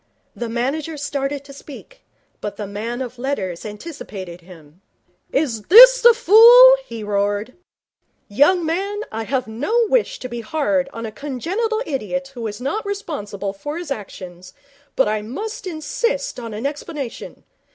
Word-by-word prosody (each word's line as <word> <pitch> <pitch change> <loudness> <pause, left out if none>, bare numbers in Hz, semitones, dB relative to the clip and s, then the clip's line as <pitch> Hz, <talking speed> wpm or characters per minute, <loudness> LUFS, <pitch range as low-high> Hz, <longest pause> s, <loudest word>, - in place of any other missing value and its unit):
The 240 -1 -5
manager 280 +7 -2
started 280 0 -3
to 280 0 -13
speak, 295 - -13 0.4
but 205 - -5
the 210 - -4
man 225 +5 -4
of 245 -1 -9
letters 200 -10 -3
anticipated 205 - -9
him. 165 -1 -16 0.5
'Is 260 -7 0
this - - +9
the 475 -1 +7
fool?' 480 +3 +8
he 230 - -8
roared. 205 +3 -1 0.7
'Young 295 - +3
man, 395 +6 -2
I 225 0 -4
have 255 +2 -1
no 295 - 0
wish - - +1
to 255 - -7
be 240 -1 -6
hard 280 +2 -1
on 230 -3 -6
a 220 - -6
congenital 365 - -3
idiot 270 0 -3
who 235 -3 -5
is 205 +1 -7
not 275 - -3
responsible 240 - -5
for 290 +10 -6
his 345 -4 -7
actions, 185 -6 -8 0.4
but 270 - +3
I 215 0 -1
must 415 - -6
insist 465 - -2
on 230 -2 -7
an 220 +5 -5
explanation. 290 -3 -6
270 Hz, 150 wpm, -20 LUFS, 215-340 Hz, 0.7 s, this